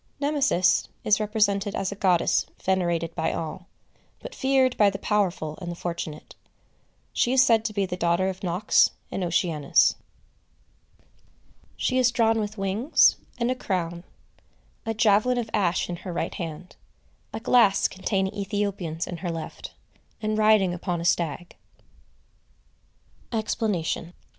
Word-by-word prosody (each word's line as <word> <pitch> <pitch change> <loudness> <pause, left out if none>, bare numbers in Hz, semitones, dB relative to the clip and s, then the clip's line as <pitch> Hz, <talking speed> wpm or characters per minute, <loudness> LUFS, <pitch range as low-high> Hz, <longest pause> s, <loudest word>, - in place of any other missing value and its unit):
Nemesis 285 - +2 0.2
is 215 0 +3
represented 205 -2 0
as 195 0 -2
a - - -5
goddess 185 -4 +2 0.2
venerated 175 -3 0
by 160 0 -1
all, 165 +3 -5 0.5
but - - -9
feared 265 - +2
by 205 -1 +5
the 195 - -5
powerful 185 -7 -1
and 175 - -5
the - - -6
fortunate. 170 -3 -6 0.8
She 245 - +1
is 260 0 +6
said 225 -3 +3
to 220 - -1
be 200 -1 0
the 180 - -4
daughter 175 +1 +1
of 190 -1 -4
Nox 180 +3 +3 0.2
and 190 - -3
Oceanus. 165 -4 +2 1.8
She 255 0 +1
is 250 -1 +4
drawn 225 -2 +2
with 210 0 -4
wings, 200 +9 +3 0.2
and 240 +1 0
a - - 0
crown; 175 -7 -3 0.8
a 225 - -1
javelin 220 +3 +3
of 230 -3 -3
ash 185 -4 +1
in 175 - -5
her 185 +1 -7
right 170 - -3
hand; 170 +1 -7 0.5
a - - -5
glass 225 -4 +4
containing 190 0 -2
Ethiopians 195 -5 -3
in 175 - -6
her 175 +1 -4
left; 165 -1 -6 0.5
and 215 0 -1
riding 215 -4 +4
upon 175 0 -3
a 170 - -5
stag. 170 0 -1 1.8
EXPLANATION. 210 -7 -2
195 Hz, 140 wpm, -25 LUFS, 175-220 Hz, 1.8 s, is